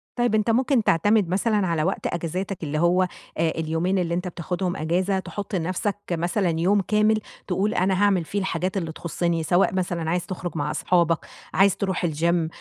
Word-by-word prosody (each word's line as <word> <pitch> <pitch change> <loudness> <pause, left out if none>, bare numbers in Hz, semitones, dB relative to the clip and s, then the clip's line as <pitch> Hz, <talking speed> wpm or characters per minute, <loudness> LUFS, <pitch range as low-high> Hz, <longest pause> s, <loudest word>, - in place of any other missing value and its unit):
طيب 240 -3 +1
أنت 215 +1 +1
ممكن 250 +1 +3
تعتمد 205 +3 +3
مثلًا 205 +1 +1
على 165 -2 0
وقت 190 +4 -1
أجازاتك 175 +2 -3
اللي 155 0 -2
هو 175 +2 +3 0.4
آآ، 165 0 +2
اليومين 165 +4 -1
اللي 170 -2 -1
أنت 180 +2 -2
بتاخدهم 180 +1 -3
أجازة 185 +4 0
تحط 195 +3 -5
لنَفسك 185 +4 -1 0.2
مثلًا 175 0 0
يوم 195 +4 +3
كامل، 215 +3 +2 0.3
تقول 195 +3 0
أنا 185 +1 +1
هاعمل 195 -4 +3
فيه 205 - -2
الحاجات 185 0 -2
اللي 165 -4 -2
تخصّني، 170 +1 -2
سواء 175 +5 +2
مثلًا 175 -3 -1
عايز 175 +1 0
تخرج 175 -2 -5
مع 150 0 -1
أصحابك، 170 -1 +2 0.3
عايز 195 +2 +4
تروح 190 -3 -1
الgym، 165 +1 +1
180 Hz, 175 wpm, -24 LUFS, 170-195 Hz, 0.4 s, عايز